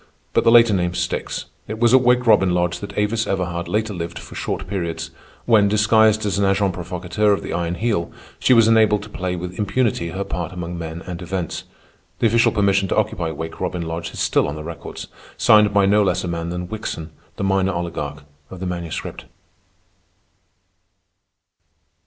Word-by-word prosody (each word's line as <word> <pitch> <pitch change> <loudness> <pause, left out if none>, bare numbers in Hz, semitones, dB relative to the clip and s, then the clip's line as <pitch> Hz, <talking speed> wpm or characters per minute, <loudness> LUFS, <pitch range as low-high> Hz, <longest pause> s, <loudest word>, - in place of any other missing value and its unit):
But - - +3
the - - +5
later 115 -2 +7
name 90 -2 0
sticks. - - -3 0.2
It 110 - -5
was 120 +1 +3
at 130 - +7
Wake 125 0 +3
Robin 95 -5 +4
Lodge 85 -1 0
that 100 -1 -8
Avis 105 +1 0
Everhard 85 -3 -2
later 110 0 -1
lived 85 -2 -5
for - - -10
short - - -3
periods, 85 -4 -4 0.3
when, 110 -4 +5
disguised 110 +1 +3
as 100 -1 0
an 100 - +3
agent 95 -1 +2
provocateur 90 +3 -1
of 100 - -2
the - - -5
Iron 85 0 -1
Heel, 100 -3 -1 0.3
she - - +2
was 115 -3 +6
enabled 110 -2 +4
to 105 - -11
play 90 -3 -3
with 90 +2 -6
impunity 105 -4 0
her 95 +3 -3
part 85 -3 -4
among 90 -1 -5
men 85 +1 -6
and 90 -1 -7
events. 90 -1 -4 0.5
The - - 0
official 115 +1 +4
permission 100 -2 +2
to - - -1
occupy 85 -2 0
Wake 80 +1 -6
Robin 90 -2 -2
Lodge 85 +1 -4
is - - -8
still - - +2
on 70 - -4
the 75 - -7
records, 85 0 -7 0.3
signed 105 -1 +5
by 100 -1 +4
no 105 +2 +4
less 95 -2 +1
a - - -3
man 85 -1 -3
than 90 0 -4
Wickson, 85 -6 -5 0.2
the - - -4
minor 95 0 +2
oligarch 80 -4 -4 0.3
of 95 - -9
the 95 - -4
Manuscript. 85 -3 -5
95 Hz, 190 wpm, -21 LUFS, 85-105 Hz, 0.5 s, later